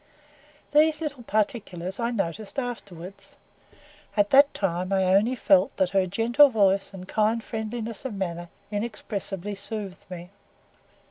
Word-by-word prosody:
These 305 +1 +4
little 290 -5 -4
particulars 200 -4 -2
I 235 0 0
noticed 205 - -3
afterwards; 200 -8 -6 0.8
at 205 0 +3
that 280 +1 +7
time 185 -1 -2
I 190 -1 +2
only 220 +6 +3
felt 195 -5 +3
that 185 -2 +1
her 195 -1 +2
gentle 235 +9 +5
voice 200 -4 +2
and 185 -2 -10
kind 220 +2 +1
friendliness 225 +1 -5
of 260 -6 -4
manner 175 -3 -4 0.2
inexpressibly 205 -2 -4
soothed 200 -1 -6
me. 180 0 -8
205 Hz, 130 wpm, -26 LUFS, 190-235 Hz, 0.8 s, that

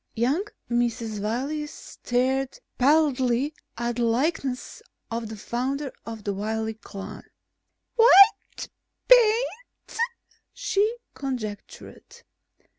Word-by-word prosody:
Young 255 +10 +1 0.3
Mrs. 230 -3 -1
Wiley 270 +8 -2
stared 265 -2 -2 0.2
pallidly 275 -1 +3 0.2
at 235 0 -2
the 240 - +1
likeness 255 +2 -1 0.3
of 230 -1 -3
the 220 - -7
founder 265 +6 -3
of 225 -2 -7
the 200 - -1
Wiley 220 +2 -2
clan. 200 -2 -9 0.8
"White 450 -3 +6 0.4
paint," 485 0 +3 0.5
she 425 +4 0 0.2
conjectured. 240 -7 -7
250 Hz, 90 wpm, -25 LUFS, 225-300 Hz, 0.8 s, White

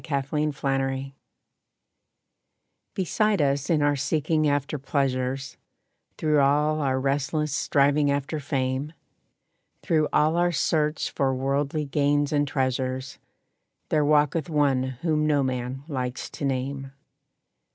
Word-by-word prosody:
=The - - -13
Question= 135 -2 -1 1.8
Beside 205 +2 +1
us 140 -1 +1
in 155 -3 +3
our 145 0 +3
seeking 155 +2 0
after 145 +1 -1
pleasures, 135 -2 -2 0.6
Through 150 -2 +2
all 150 +2 +3
our 130 -2 +1
restless 140 +2 -1
striving 145 +1 +2
after 140 +2 -1
fame, 135 +1 -2 0.9
Through 155 -2 +2
all 155 +3 +3
our 175 0 +3
search 150 0 0
for 135 -1 0
worldly 140 +3 -1
gains 145 +1 +1
and 145 0 +2
treasures, 130 -1 -2 0.7
There 155 -1 +2
walketh 150 +2 +2
one 145 -4 +2 0.2
whom 155 -2 +1
no 145 -2 +2
man 130 +1 -3
likes 130 -4 -4
to 145 - -5
name. 135 +1 -3
145 Hz, 115 wpm, -25 LUFS, 135-150 Hz, 1.8 s, in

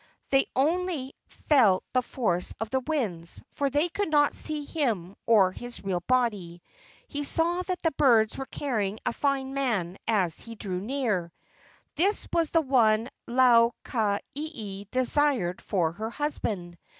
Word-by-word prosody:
They 270 0 +4
only 310 -1 0
felt 225 -11 +3
the 255 - +3
force 215 -8 -2
of 225 0 -4
the 265 - +2
winds, 225 - -3
for 280 -1 -1
they 290 +5 +2
could 400 +2 -2
not 290 -1 +3
see 300 -2 -2
him 220 - -2
or 205 -5 +5
his 245 +4 -7
real 190 -2 -1
body. 205 -9 0 0.4
He 290 -1 -4
saw 340 +4 +1
that 365 -1 -4
the 325 - +2
birds 235 -7 +3
were 270 - -5
carrying 215 -8 -2
a - - 0
fine 270 -1 -1
man 215 -10 -1
as 185 -7 +1
he 230 0 -8
drew 185 -4 -4
near. 210 -8 -1 0.7
This 390 +6 +1
was 335 -2 +2
the 330 - +3
one 235 -5 +3 0.2
Lau 240 -1 +5
ka 210 -4 0 0.2
ieie 215 -10 -6
desired 255 -7 +1
for 175 -5 0
her 215 +6 -5
husband. 210 - -3
245 Hz, 150 wpm, -27 LUFS, 200-290 Hz, 0.7 s, or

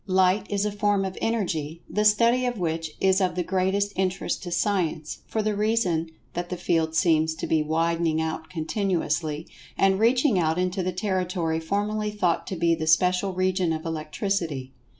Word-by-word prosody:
Light 185 +1 +3
is 205 0 0
a 210 - 0
form 205 -1 +1
of 190 -1 -4
Energy, 170 -8 -2
the 210 0 0
study 235 +4 +4
of 245 -2 -2
which 165 -3 -2
is 190 +1 +3
of 185 -2 +1
the 180 - 0
greatest 190 +3 0
interest 190 0 -1
to 180 - -6
Science, 170 -4 -1
for 220 - -1
the 210 -1 0
reason 200 -7 +1 0.2
that 175 0 -4
the 180 - -3
field 165 -2 0
seems 160 0 +3
to - - -4
be 160 -1 +2
widening 165 +1 +1
out 160 0 -3
continuously, 160 -3 -1 0.3
and 195 0 +3
reaching 240 -1 +3
out 160 -1 +1
into 185 +1 0
the 185 0 -1
territory 180 -3 -1
formerly 205 +5 -1
thought 185 -5 0
to 190 - -3
be 170 0 +2
the 160 -1 -2
special 180 +4 +3
region 185 -1 +1
of 160 0 -3
Electricity. 160 -3 -2
180 Hz, 175 wpm, -25 LUFS, 160-200 Hz, 0.3 s, study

